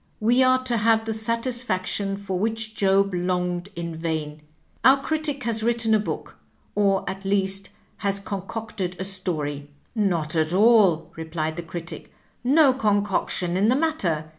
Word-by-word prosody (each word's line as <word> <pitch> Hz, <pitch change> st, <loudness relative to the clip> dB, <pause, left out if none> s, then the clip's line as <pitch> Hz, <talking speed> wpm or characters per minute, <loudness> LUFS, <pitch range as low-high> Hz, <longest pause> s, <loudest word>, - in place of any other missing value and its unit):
We 240 Hz, +4 st, +3 dB
are 255 Hz, 0 st, +4 dB
to 245 Hz, -2 st, +1 dB
have 225 Hz, 0 st, +2 dB
the 225 Hz, -, -1 dB
satisfaction 220 Hz, -4 st, -1 dB
for 195 Hz, -2 st, -4 dB
which 220 Hz, +1 st, -1 dB
Job 195 Hz, -1 st, +2 dB
longed 180 Hz, 0 st, -1 dB
in 170 Hz, -1 st, -5 dB
vain. 155 Hz, -2 st, -3 dB, 0.4 s
Our 265 Hz, +1 st, +7 dB
Oritic 305 Hz, -4 st, 0 dB
has 225 Hz, -1 st, 0 dB
written 230 Hz, -1 st, +1 dB
a 215 Hz, -, +5 dB
book, 210 Hz, -, -5 dB, 0.4 s
or 195 Hz, -2 st, +1 dB
at 195 Hz, +1 st, -5 dB
least 195 Hz, 0 st, +1 dB, 0.3 s
has 200 Hz, 0 st, -1 dB
con 200 Hz, -1 st, -6 dB
cocted 210 Hz, -5 st, -4 dB
a 190 Hz, -, -4 dB
story." 155 Hz, -7 st, -3 dB, 0.2 s
"Not 175 Hz, -8 st, 0 dB
at 160 Hz, +1 st, +1 dB
all! 200 Hz, -5 st, +4 dB
" -, -, -26 dB
replied 160 Hz, -1 st, -3 dB
the 175 Hz, -, -4 dB
Oritic; 165 Hz, 0 st, -7 dB, 0.4 s
"no 275 Hz, +1 st, +5 dB
concoction 205 Hz, -6 st, 0 dB
in 195 Hz, +3 st, +3 dB
the 250 Hz, -, +4 dB
mat 315 Hz, +2 st, 0 dB
ter. 160 Hz, -4 st, -1 dB
195 Hz, 165 wpm, -24 LUFS, 175-225 Hz, 0.4 s, Our